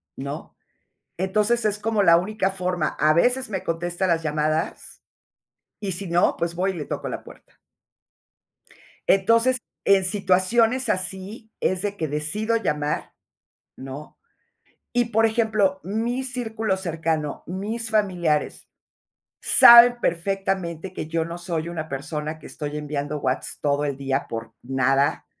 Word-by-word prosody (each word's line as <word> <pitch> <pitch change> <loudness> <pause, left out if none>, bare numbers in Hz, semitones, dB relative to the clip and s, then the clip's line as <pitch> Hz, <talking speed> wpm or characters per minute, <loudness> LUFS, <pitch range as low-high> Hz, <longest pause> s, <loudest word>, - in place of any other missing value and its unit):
¿no? 140 +3 -7 0.6
Entonces, 210 +6 +1
es 210 -1 0
como 215 -1 +1
la 170 -3 +7
única 195 +2 -1
forma. 180 -4 -1
A 155 0 +4
veces 245 +8 +2
me 190 -3 -3
contesta 175 +3 -2
las 165 -2 +1
llamadas, 155 +1 -2 0.8
y 200 -2 -2
si 180 +2 -4
no, 170 +1 +2
pues 170 0 -2
voy 190 +2 0
y - - -10
le 155 -4 -5
toco - - -4
la - - -5
puerta. - - -17 1.5
Entonces, 230 +6 +4 0.3
en 195 -1 +4
situaciones 220 +6 +2
así 190 +4 -3
es 185 -1 0
de 205 0 -3
que 160 - -2
decido 155 +10 -1
llamar, 150 -8 -2 0.6
¿no? 135 +3 -9 0.7
Y 240 0 +2
por 225 -1 +3
ejemplo, 215 -4 +1
mi 230 +7 -2
círculo 225 -5 -2
cercano, 160 -4 -2
mis 215 +5 -3
familiares 180 -8 0 0.7
saben 240 0 +8
perfectamente 185 -1 -2
que 155 - -5
yo 165 0 -1
no 170 +1 -6
soy 170 -2 -3
una 160 -2 -5
persona 150 +3 -4
que - - -11
estoy 150 -1 -5
enviando 150 0 -3
whats - - -2
todo 145 0 +1
el 140 -2 -2
día 135 0 -2
por 115 0 -6
nada, 135 +2 +1
185 Hz, 135 wpm, -23 LUFS, 155-215 Hz, 1.5 s, saben